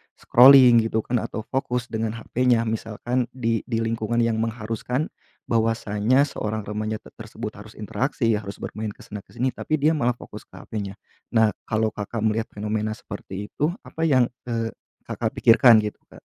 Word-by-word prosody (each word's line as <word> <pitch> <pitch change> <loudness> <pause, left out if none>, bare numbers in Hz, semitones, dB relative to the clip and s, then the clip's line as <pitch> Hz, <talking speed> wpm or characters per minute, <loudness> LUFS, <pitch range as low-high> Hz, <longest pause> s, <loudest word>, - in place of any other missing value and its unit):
scrolling 125 -1 +8
gitu 110 0 0
kan 120 +2 -1
atau 115 0 -4
fokus 125 -2 -2
dengan 110 -1 -2
HP-nya, 120 +1 +1
misalkan 115 +2 -2
di 115 -3 -1
di 115 -3 -1
lingkungan 115 +1 0
yang 115 -1 +1
mengharuskan 115 +5 -2 0.4
bahwasanya 115 +2 +2
seorang 110 -6 -3
remaja 105 +1 -4
t - - -14
tersebut 110 0 -6
harus 105 +1 -12
interaksi, 115 +3 -1
harus 100 -1 -8
bermain 110 -1 -5
ke - - -18
sana 105 0 -7
ke - - -21
sini 130 +2 +1
tapi 155 - -2
dia 155 +2 +4
malah 125 -3 +2
fokus - - -11
ke - - -18
HP-nya. 100 -3 -5 0.4
Nah, 110 -1 +5 0.2
kalau 110 0 +1
Kakak 105 +2 -5
melihat 110 +1 0
fenomena 105 +1 -2
seperti 100 -1 -8
itu, 155 +4 -1
apa 160 0 -3
yang, 130 -4 +4 0.2
eee, 115 -1 -1 0.4
Kakak - - -3
pikirkan 115 -1 +6
gitu, 105 - -4
Kak? - - -16
115 Hz, 170 wpm, -24 LUFS, 110-120 Hz, 0.4 s, scrolling